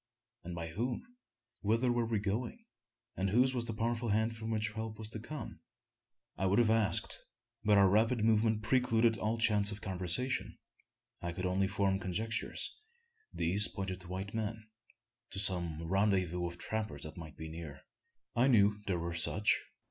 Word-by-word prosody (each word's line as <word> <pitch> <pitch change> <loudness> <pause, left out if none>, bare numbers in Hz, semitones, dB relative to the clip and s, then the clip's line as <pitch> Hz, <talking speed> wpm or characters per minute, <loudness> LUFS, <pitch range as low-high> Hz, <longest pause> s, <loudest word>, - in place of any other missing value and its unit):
and 85 0 -6
by 85 -1 -4
whom? 120 - -3 0.6
Whither 115 +4 +2
were 120 -1 +1
we 115 -1 0
going? 115 - -3 0.5
and 95 +1 0
whose 125 +6 +4
was 120 -2 +1
the 115 -2 -4
powerful 115 +1 -1
hand 110 +2 +1
from 110 0 -6
which 110 -1 0
help 110 0 -5
was 110 -1 -3
to 110 - -6
come? 120 +1 -7 0.8
I 95 - +2
would 100 +2 +3
have 115 -2 +4
asked; 110 -2 +2 0.4
but 105 -1 +5
our 100 -1 +7
rapid 110 +3 +3
movement 110 -1 +3
precluded 115 -2 +3
all 110 +2 0
chance 105 -3 +3
of 105 - -6
conversation. 95 +6 -1 0.6
I 85 - -3
could 90 +2 -4
only 95 +1 +1
form 100 -1 +1
conjectures. 105 +4 -1 0.6
These 100 +6 +3
pointed 95 -2 -4
to 85 - -12
white 95 +3 -5
men 110 0 -3 0.6
to - - -8
some 85 -5 +1
rendezvous 90 -1 +1
of 85 0 -7
trappers 105 -6 -3
that 75 - -6
might 80 -4 -10
be 80 - -6
near. 80 -4 -8 0.5
I 120 +3 +4
knew 105 -4 +4
there 95 -3 +1
were 85 0 -3
such. 95 +5 +3
105 Hz, 170 wpm, -33 LUFS, 95-115 Hz, 0.8 s, our